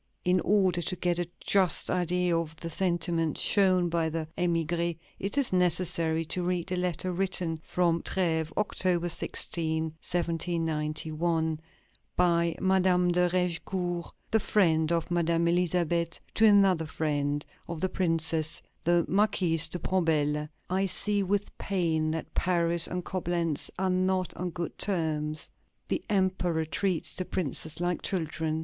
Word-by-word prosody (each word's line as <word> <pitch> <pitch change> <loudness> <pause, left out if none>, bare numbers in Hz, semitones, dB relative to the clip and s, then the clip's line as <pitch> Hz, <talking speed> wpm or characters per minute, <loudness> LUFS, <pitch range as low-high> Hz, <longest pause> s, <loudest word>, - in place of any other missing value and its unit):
In 180 +1 +3
order 185 -1 +2
to 185 +3 -2
get 175 -1 0
a 175 -1 -2
just 190 -3 +2
idea 180 0 +1
of 165 -1 -2
the 165 +1 -7
sentiments 170 -2 0
shown 185 -3 +4
by 165 -1 0
the 160 0 -3
émigrés, 170 -1 0 0.2
it 200 +8 -2
is 275 -8 +2
necessary 170 -2 +1
to 180 +3 -1
read 180 0 -2
a - - +1
letter 180 0 -1
written 180 -3 0
from 170 -2 +1
Trèves, 160 -4 0
October 180 -4 +1
16, 160 -1 0 0.2
1791, 160 -1 -1 0.6
by 170 -2 +2
Madame 185 -1 +3
de 180 0 +3
Raigecourt, 180 0 -1 0.2
the 220 - +4
friend 165 -7 +2
of 170 0 0
Madame 170 -1 +2
Elisabeth, 170 -1 +1
to 220 - +5
another 195 -6 +4
friend 145 -2 -1 0.2
of 170 -2 -5
the 190 - 0
Princess, 165 -2 0 0.2
the 175 0 +3
Marquise 185 -5 +2
de - - -3
Bombelles: 155 -4 0 0.2
"I 190 +2 +1
see 205 +2 0
with 200 +1 -1
pain 165 -5 0
that 160 0 -4
Paris 170 -2 +1
and 180 -1 -4
Coblentz 170 -4 -1
are 190 0 +1
not 185 0 0
on 180 0 -3
good 170 0 -5
terms. 155 -5 -1 0.4
The - - 0
Emperor 185 -5 +1
treats 180 +1 -2
the 185 - 0
Princes 160 -2 -3
like 175 -1 -1
children.... 160 -3 -2
175 Hz, 140 wpm, -28 LUFS, 160-185 Hz, 0.6 s, to